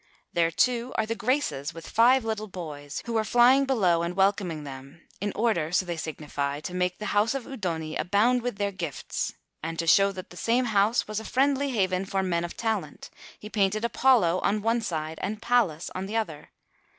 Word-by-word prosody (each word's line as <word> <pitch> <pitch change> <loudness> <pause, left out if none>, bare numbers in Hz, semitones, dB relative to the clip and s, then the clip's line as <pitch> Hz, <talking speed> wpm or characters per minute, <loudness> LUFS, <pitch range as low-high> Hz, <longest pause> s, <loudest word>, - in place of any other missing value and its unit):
There, 170 -1 +3
too, 240 +8 +1
are - - +1
the 225 - -2
Graces, 200 - -1
with 165 - -9
five 245 +2 +4
little 215 -1 -2
boys 150 -6 -7
who 235 - -3
are 220 - +2
flying 245 +5 +5
below 190 -11 +2
and 170 +1 -3
welcoming 190 -5 +1
them, 135 +3 -11
in 205 +1 -2
order, 205 -8 +1
so 185 +1 +2
they 175 -1 -3
signify, 145 -3 -4
to 180 - -6
make 180 0 0
the 210 - -6
house 210 +5 +2
of 270 - -3
the - - -12
Udoni 165 -10 -3
abound 220 +7 +2
with 245 -2 -3
their 200 -1 -1
gifts; 170 -7 -4 0.3
and 165 +1 -4
to 165 - -1
show 195 +5 +5
that 185 -1 -9
the 175 - -11
same 240 +5 +1
house 215 +1 +2
was 215 0 -3
a - - -8
friendly 275 +4 +1
haven 190 -5 0
for 195 0 -1
men 170 -2 0
of 175 - -6
talent, 225 -1 -3 0.3
he 210 - -10
painted 215 +1 +1
Apollo 235 -8 +3
on 205 +1 0
one 230 +1 +2
side 160 -5 -4
and 210 +1 -3
Pallas 210 -11 +1
on 185 +1 -4
the 215 - -5
other. 160 -10 -4
195 Hz, 205 wpm, -27 LUFS, 170-230 Hz, 0.3 s, flying